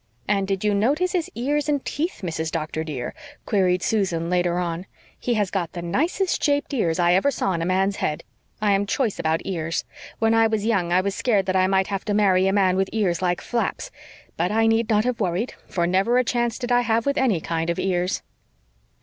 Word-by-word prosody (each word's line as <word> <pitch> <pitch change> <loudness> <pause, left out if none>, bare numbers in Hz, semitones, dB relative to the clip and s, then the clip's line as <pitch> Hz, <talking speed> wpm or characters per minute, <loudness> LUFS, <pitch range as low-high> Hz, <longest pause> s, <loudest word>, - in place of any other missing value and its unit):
"And 195 -1 +1
did 195 0 -2
you 210 -1 +2
notice 285 - +1
his 355 -4 -1
ears 290 +5 -1
and 290 -1 +2
his - - -6
teeth, 325 -1 -2
Mrs. 160 -2 -2
Doctor, 160 -1 -3
dear?" 140 -6 -5 0.3
queried 185 -4 +1
Susan 180 -6 0
later 175 -1 +1
on. 175 +1 -3 0.3
"He 240 - 0
has 205 -3 0
got 180 -4 -2
the 175 - -5
nicest 325 - 0
shaped 290 -1 +1
ears 170 -11 +1
I 175 -1 +3
ever 190 +9 +3
saw 275 - -1
on 170 -2 -1
a 165 - -1
man's 190 +2 +1
head. 150 - -2 0.4
I 210 - +3
am 200 +1 +1
choice 230 -1 -1
about 160 +1 0
ears. 165 -3 -2 0.3
When 225 0 +2
I 225 0 +5
was 220 -2 -1
young 190 -7 +1
I 180 +1 +4
was 200 +1 -2
scared 205 -3 +1
that 185 - -1
I 185 0 +4
might 190 0 +2
have 195 0 -3
to 205 - 0
marry 190 -2 +3
a - - +3
man 190 -2 +2
with 190 0 +1
ears 190 -6 0
like 175 -1 0
flaps. 240 -1 -2 0.5
But 175 +3 0
I 225 +1 +3
need 225 0 +2
not 215 -1 +3
have 250 -2 -1
worried, 190 +4 -1
for 170 -2 0
never 190 +7 +2
a 255 - +4
chance 240 -1 0
did 245 -1 -4
I 245 0 +4
have 230 -1 +1
with 280 0 +1
any 230 -10 +2
kind 165 +1 -2
of 170 - -1
ears." 180 0 -1
195 Hz, 225 wpm, -23 LUFS, 175-230 Hz, 0.5 s, I